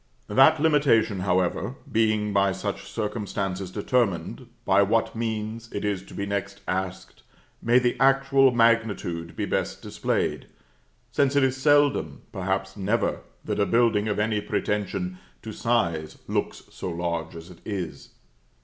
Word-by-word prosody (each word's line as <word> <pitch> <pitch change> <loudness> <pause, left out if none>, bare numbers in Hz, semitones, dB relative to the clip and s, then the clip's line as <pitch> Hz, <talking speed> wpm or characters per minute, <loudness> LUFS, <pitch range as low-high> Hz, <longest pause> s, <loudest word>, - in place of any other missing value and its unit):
That 135 +8 +6
limitation, 140 -10 +3
however, 95 +6 0 0.2
being 110 -2 +1
by 100 -1 +3
such - - -5
circumstances 100 -3 -3
determined, 100 - -1 0.2
by 95 +1 +4
what 110 +4 +1
means, 110 0 -4
it 100 - -3
is 100 -3 -1
to - - -12
be 100 - -2
next 100 0 -4
asked, 95 0 -4 0.4
may 120 +2 +4
the 125 -1 +2
actual 135 0 +5
magnitude 110 -9 +1
be - - -2
best - - -2
displayed; - - -2 0.6
since 140 -1 +2
it 140 - +4
is 130 -1 +2
seldom, 140 - +2
perhaps 95 +1 -2
never, 105 +3 0 0.3
that - - -2
a 100 - +4
building 115 -3 +3
of 105 - -1
any 105 0 0
pretension 95 -3 -2 0.2
to - - -6
size 85 -10 0
looks - - -2
so - - -5
large 85 -1 -3
as 85 +2 -10
it 85 - -15
is. 95 -6 -5
105 Hz, 140 wpm, -25 LUFS, 95-115 Hz, 0.6 s, That